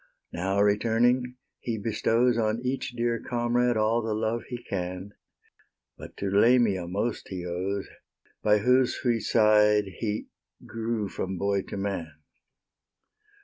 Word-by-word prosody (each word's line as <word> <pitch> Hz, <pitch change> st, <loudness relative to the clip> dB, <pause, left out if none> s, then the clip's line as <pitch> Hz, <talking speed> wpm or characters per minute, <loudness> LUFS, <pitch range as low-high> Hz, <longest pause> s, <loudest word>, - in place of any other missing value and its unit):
Now, 95 Hz, +3 st, -1 dB
returning, 120 Hz, +4 st, +2 dB, 0.2 s
he 115 Hz, -2 st, -3 dB
bestows 115 Hz, +3 st, +1 dB
On 110 Hz, 0 st, 0 dB
each, 130 Hz, -1 st, -2 dB
dear 120 Hz, -1 st, 0 dB
comrade 120 Hz, 0 st, 0 dB
all 110 Hz, +2 st, +2 dB
the 110 Hz, -1 st, -2 dB
love 110 Hz, +2 st, -1 dB
he 125 Hz, -, -4 dB
can; 90 Hz, -1 st, -5 dB, 0.8 s
But -, -, -12 dB
to 100 Hz, -1 st, -2 dB
Lamia 105 Hz, -4 st, +3 dB
most 105 Hz, +6 st, -3 dB
he 90 Hz, -2 st, -6 dB
owes, 95 Hz, +3 st, -3 dB, 0.5 s
By 105 Hz, 0 st, +4 dB
whose 125 Hz, +4 st, +3 dB
sweet 120 Hz, -3 st, 0 dB
side 105 Hz, -2 st, +4 dB
he 105 Hz, -2 st, -2 dB, 0.4 s
grew 115 Hz, -2 st, -3 dB
from 95 Hz, 0 st, -4 dB
boy 100 Hz, +1 st, 0 dB
to -, -, -5 dB
man. 95 Hz, -6 st, -3 dB
110 Hz, 130 wpm, -27 LUFS, 100-120 Hz, 0.8 s, By